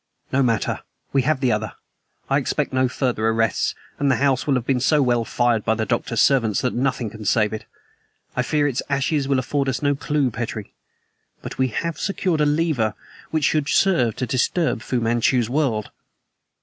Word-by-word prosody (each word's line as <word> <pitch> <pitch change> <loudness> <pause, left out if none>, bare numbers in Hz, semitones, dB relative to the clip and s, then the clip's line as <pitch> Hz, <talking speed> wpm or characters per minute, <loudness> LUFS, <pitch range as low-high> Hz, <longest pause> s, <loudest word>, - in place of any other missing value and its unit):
"No 135 - +3
matter. 115 -5 0 0.3
We 135 - +4
have 140 +1 0
the 130 -3 +2
other. 105 0 -2 0.5
I - - +2
expect - - -2
no 130 0 +3
further 125 -3 -1
arrests, 115 -2 +1 0.2
and 140 - +2
the 130 - +4
house 135 0 +1
will 140 - +3
have 125 -2 -1
been 130 -1 +1
so 150 +4 +3
well 120 -4 +2
fired 120 -2 +1
by 110 - +1
the 110 0 -1
Doctor's 115 -1 0
servants 115 -8 +3
that 125 - 0
nothing 125 -3 -1
can 110 -1 -9
save 105 +1 +2
it. 110 - -6 0.7
I 125 - +1
fear 145 +2 +1
its 130 -4 -1
ashes 140 +1 0
will 140 -1 +2
afford 135 +2 0
us 130 +2 -3
no 145 0 +3
clew, 140 -1 0
Petrie; 110 -2 -5 0.7
but - - -7
we 130 - +3
have 165 +7 -3
secured 185 -5 0
a 150 - +3
lever 145 -8 +1 0.3
which 155 -1 -1
should 150 +1 +1
serve 155 - +3
to 125 - -2
disturb 130 +3 0
Fu 125 - -1
Manchu's 120 +1 +1
world." 130 -7 0
130 Hz, 190 wpm, -22 LUFS, 115-140 Hz, 0.7 s, We